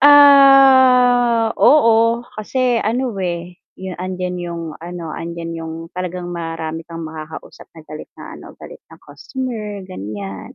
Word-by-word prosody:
Ah, 260 -5 +6
oo, 230 -4 +4
kasi 245 +2 0
ano, 245 +3 -2
eh, 175 -1 -5 0.2
'yung 185 -1 -8
andiyan 180 0 -4
'yung 170 -1 -6 0.2
ano, 170 -2 -7
andiyan 170 0 -6
'yung 160 0 -7 0.2
talagang 180 -1 -5
marami 165 -1 -5
kang 165 -1 -7
makakausap 155 0 -10
na 160 - -12
galit 155 0 -10
na - - -10
ano, - - -14
galit - - -12
na - - -15
customer 220 -7 -7
ganiyan, 100 - -8
185 Hz, 130 wpm, -18 LUFS, 165-245 Hz, 0.2 s, Ah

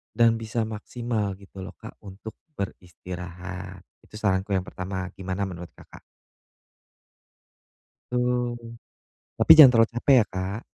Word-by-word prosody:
dan 115 -1 +4
bisa 115 +1 -2
maksimal 110 -1 -3
gitu 100 0 -14
loh 95 - -8
Kak, - - -12
untuk 100 +2 -10 0.2
beristirahat. 90 - -7 0.2
Itu - - -18
saranku 100 -2 0
yang 95 - 0
pertama. 95 0 -5
Gimana 95 +1 -4
menurut 90 -3 -6
Kakak? - - -15 2.1
Itu. 125 0 0 0.8
Tapi - - 0
jangan 140 -5 +12
terlalu 115 -1 +5
capek 135 +3 +4
ya, - - -3
Kak. 95 +3 -4
100 Hz, 125 wpm, -25 LUFS, 95-115 Hz, 2.1 s, jangan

